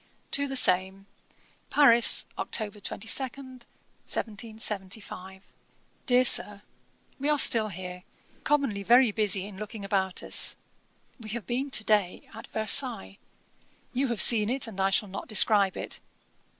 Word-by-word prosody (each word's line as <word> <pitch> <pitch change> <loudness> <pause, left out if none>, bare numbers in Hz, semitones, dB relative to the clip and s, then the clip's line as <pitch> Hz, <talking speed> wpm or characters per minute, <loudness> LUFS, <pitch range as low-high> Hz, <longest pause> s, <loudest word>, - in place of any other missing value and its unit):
To 280 0 +2
THE 270 - -6
SAME. 190 -4 +2 0.6
'Paris, 265 -5 +5
Oct. - - -6
22, 210 -2 -3
1775. 220 -6 -6 0.5
'DEAR 250 0 +3
SIR, 205 -4 +4 0.6
'We 285 +2 -2
are 300 - +2
still 225 -5 +5
here, 180 -2 -9 0.4
commonly 275 -9 -1
very 240 +3 +4
busy 205 -3 0
in 200 -2 -11
looking 215 0 -8
about 190 -2 -2
us. - - -3 0.6
We 220 -2 -10
have 220 -2 -6
been 255 +7 -3
to 220 - -1
day 205 -4 -1
at 225 - -11
Versailles. 220 -1 0 0.7
You 265 +2 -1
have 235 -4 -2
seen 215 -3 +5
it, 265 +2 -1
and 215 -4 -9
I 195 - +1
shall 205 +2 0
not 195 - -8
describe 205 -2 +3
it. - - -5
215 Hz, 135 wpm, -26 LUFS, 195-245 Hz, 0.7 s, Paris